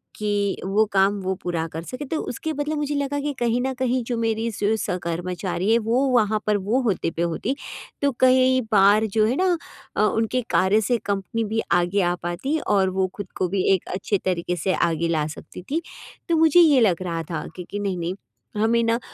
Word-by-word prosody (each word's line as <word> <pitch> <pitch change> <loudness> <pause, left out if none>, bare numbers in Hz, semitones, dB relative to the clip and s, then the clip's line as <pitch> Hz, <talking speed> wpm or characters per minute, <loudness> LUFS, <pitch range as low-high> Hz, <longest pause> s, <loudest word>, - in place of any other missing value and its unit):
कि 205 -2 -1
वो 200 +3 +3
काम 195 +1 +3
वो 190 0 -1
पूरा 170 -2 -1
कर 160 +1 -5
सकें। 255 - -7
तो 320 - -1
उसके 315 +6 -4
बदले 295 +1 -2
मुझे 295 -1 -2
लगा 285 0 -1
कि 290 +1 -1
कहीं 240 0 +1
न 265 +1 -1
कहीं 255 -1 +1
जो 240 0 -2
मेरी 225 0 0
सु 210 0 0
सहकर्मचारी 180 +1 -2
है 230 - +5
वो 230 +3 +1
वहाँ 215 -3 +2
पर 210 -1 +3
वो 210 +7 0
होते 200 -8 0
पे 165 - -4
होती, 170 +10 -1 0.5
तो 285 0 +2
कई 260 0 +4
बार 205 +1 +5
जो 215 - +5
है 240 - 0
ना 365 +1 +2 0.4
अ, - - +1
उनके 225 +3 +1
कार्य 190 +5 +3
से 235 +4 +1
कंपनी 200 +3 -2
भी 220 +1 -1
आगे 175 +3 +2
आ 175 -1 +1
पाती 175 - -1
और 195 -2 +3
वो 190 0 0
खुद 200 -3 -7
को 185 - +1
भी 190 0 0
एक 190 - -1
अच्छे 200 +2 0
तरीक़े 180 -1 -1
से 185 +3 -1
आगे 170 0 +1
ला 160 -3 0
सकती 160 +3 -10
थी, 320 +3 +1 0.5
तो 335 - +3
मुझे 320 +1 +5
ये 305 -6 +6
लग 190 -6 +3
रहा 165 -2 -3
था 155 -2 -3
कि 180 - -6
कि 205 - -4
नहीं-नहीं 185 -3 -2 0.4
हमें 230 +2 +2
ना, 230 +1 +1
210 Hz, 210 wpm, -23 LUFS, 185-250 Hz, 0.5 s, ये